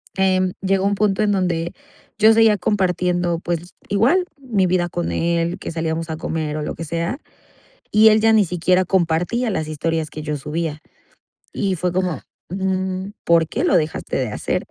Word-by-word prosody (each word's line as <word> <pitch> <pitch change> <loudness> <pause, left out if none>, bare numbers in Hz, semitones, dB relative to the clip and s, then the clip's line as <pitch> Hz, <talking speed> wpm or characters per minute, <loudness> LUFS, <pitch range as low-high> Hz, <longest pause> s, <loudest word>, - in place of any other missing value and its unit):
em, 185 -1 +2
llegó 195 0 +1
un 200 0 +2
punto 205 0 +1
en 205 -1 +2
donde 175 -3 -1 0.4
yo 220 +1 +6
seguía 220 -2 +5
compartiendo, 180 -3 0
pues 175 +1 -4 0.2
igual 245 - +3 0.2
mi 220 -9 0
vida 175 -1 +1
con 175 0 -3
él, 170 +1 0
que - - -5
salíamos 165 0 -2
a 160 - -2
comer 155 -2 -3
o 155 - -3
lo 150 - -3
que 165 - -6
sea, 170 - -2 0.7
y 220 +1 +7
él 215 0 +4
ya 225 0 +5
ni 215 -2 +5
siquiera 180 +2 +1
compartía 180 +7 +1
las 160 -6 -2
historias 155 +1 -2
que 155 - -6
yo 150 -1 -3
subía 150 +2 -3 0.7
y 195 -2 -1
fue 180 +1 -1
como: 180 -5 -1 0.3
"Mm, 190 0 -2
¿por 170 -1 +4
qué - - -2
lo - - +4
dejaste 160 -2 -1
de 130 -3 0
hacer?". 105 - -2
180 Hz, 180 wpm, -20 LUFS, 165-195 Hz, 0.7 s, y